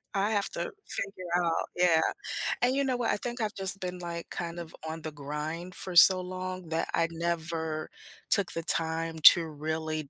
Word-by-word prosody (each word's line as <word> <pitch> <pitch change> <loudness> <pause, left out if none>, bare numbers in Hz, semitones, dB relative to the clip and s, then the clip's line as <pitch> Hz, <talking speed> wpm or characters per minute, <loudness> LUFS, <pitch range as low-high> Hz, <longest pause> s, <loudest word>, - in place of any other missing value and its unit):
I 200 +2 +1
have 205 -2 +1
to 170 - -4 0.2
figure 195 -2 -5 0.2
out. 165 -1 0
Yeah, 175 -2 +4 0.6
and 250 +2 +3
you 280 - +2
know 260 -2 0
what? 240 -2 +1
I - - +1
think 240 +3 -4
I've 215 -1 -1
just 195 0 -3
been, 180 -1 -4
like, 170 -1 -5
kind 170 0 -4
of 165 -2 -8
on 160 +1 -5
the 155 - -4
grind 150 +5 -5
for 185 -2 -5
so 185 +2 +8
long 185 -1 -5
that 160 0 0
I 165 - +2
never 165 -2 -2 0.4
took 200 -3 +3
the 165 - -3
time 165 0 0 0.2
to 170 - -2
really 155 0 -3
170 Hz, 190 wpm, -29 LUFS, 160-185 Hz, 0.6 s, so